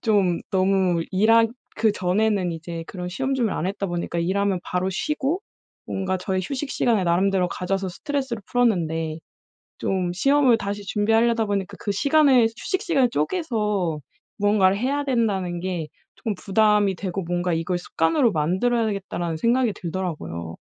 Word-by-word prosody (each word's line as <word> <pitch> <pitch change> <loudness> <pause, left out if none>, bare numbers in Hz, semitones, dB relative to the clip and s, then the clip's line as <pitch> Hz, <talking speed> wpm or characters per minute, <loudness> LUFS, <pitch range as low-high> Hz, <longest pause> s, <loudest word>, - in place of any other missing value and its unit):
좀 200 -6 +2
너무 185 -2 +2
일하 225 +4 +5 0.3
그전에는 200 -2 +1
이제 165 0 -6
그런 180 -2 -6
시험 265 +9 -2
준비를 235 -5 0
안 175 - -1
했다 200 0 -2
보니까 175 -1 -3
일 180 +4 0
하면 200 -2 +1
바로 180 +1 -1
쉬고 300 - -1 0.5
뭔가 190 -1 -2
저의 190 0 -1
휴식시간을 245 -5 0
나름대로 180 +1 +2
가져서 190 +1 -2
스트레스를 265 - -3
풀었는데 165 -9 +1 0.6
좀 185 -2 -1
시험을 270 +5 +4
다시 205 -1 -4
준비하려다 225 +2 +2
보니까 200 -1 -2
그 205 - -2
시간을 275 +2 +4
휴식시간을 340 - +1
쪼개서 210 - -1 0.4
무언가를 200 -2 +3
해야 280 +5 0
된다는 200 -9 0
게 175 -4 -3 0.3
쪼끔 220 -3 -3
부담이 210 0 +2
되고 190 +1 -3
뭔가 175 +1 -1
'이걸 165 +2 -1
습관으로 175 - +1
만들어야 190 +9 +1
되겠다.'라는 190 -5 -3
생각이 235 +5 +2
들더라고요. 160 - -5
195 Hz, 360 characters per minute, -23 LUFS, 180-230 Hz, 0.6 s, 일하